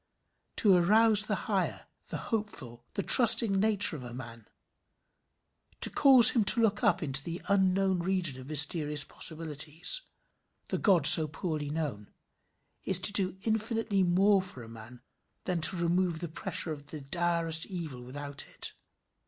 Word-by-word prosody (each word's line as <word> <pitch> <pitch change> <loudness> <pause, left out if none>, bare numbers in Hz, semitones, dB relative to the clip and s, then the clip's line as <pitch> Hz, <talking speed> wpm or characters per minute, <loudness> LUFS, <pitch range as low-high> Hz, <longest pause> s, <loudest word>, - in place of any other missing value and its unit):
To 205 -3 +2
arouse 210 +4 +3
the - - -2
higher, - - -3 0.2
the - - -6
hopeful, 205 - -7
the 200 - -3
trusting 225 -4 +6
nature 205 -4 +1
of 135 - -10
a 120 -1 -10
man; 115 -3 -12 1.3
to - - +1
cause 260 -5 +7
him 230 - 0
to 210 - +3
look 210 -1 -1
up 210 -8 0
into 135 -1 -1
the 170 +2 -7
unknown 190 -1 0
region 170 -7 -1
of 130 - -13
mysterious 150 0 +1
possibilities 160 - -3 0.7
the - - -4
God 180 -8 +1
so 160 0 +8
poorly 155 -1 -6
known 145 -10 -6 0.7
is 190 - +1
to 200 +2 +1
do 190 -2 +1
infinitely 220 -2 -2
more 190 +3 +1
for 180 -10 -9
a - - -13
man 115 +2 -14 0.4
than 180 -3 -4
to 170 +4 +5
remove 170 0 -2
the 170 - -6
pressure 160 +1 -3
of 145 -2 -10
the 150 +1 -9
direst 165 +2 -2
evil 160 -9 -8
without 140 +3 -8
it. - - -5
170 Hz, 155 wpm, -28 LUFS, 145-195 Hz, 1.3 s, so